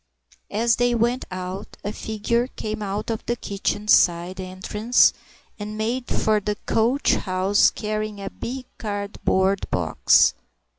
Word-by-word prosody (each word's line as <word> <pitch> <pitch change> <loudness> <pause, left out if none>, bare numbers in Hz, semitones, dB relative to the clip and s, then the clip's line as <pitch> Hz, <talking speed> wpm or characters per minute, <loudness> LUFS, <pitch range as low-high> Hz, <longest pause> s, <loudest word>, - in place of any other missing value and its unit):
As 225 +2 +2
they 245 0 +2
went 240 +2 +1
out, 185 +2 -6
a 205 - -2
figure 225 +3 -1
came 215 -4 -5
out 205 +3 -3
of 220 - -4
the 240 - +1
kitchen 205 -1 -3
side 175 -1 +3
entrance 210 +6 +2 0.5
and 210 +1 -6
made 235 +3 -2
for 215 -1 +1
the 210 +1 -2
coach 240 +6 +2
house, 190 +1 +3
carrying 215 -1 -4
a 195 -1 -5
big 255 +1 -6
cardboard 200 -2 -1
box. - - +4
210 Hz, 135 wpm, -23 LUFS, 195-230 Hz, 0.5 s, box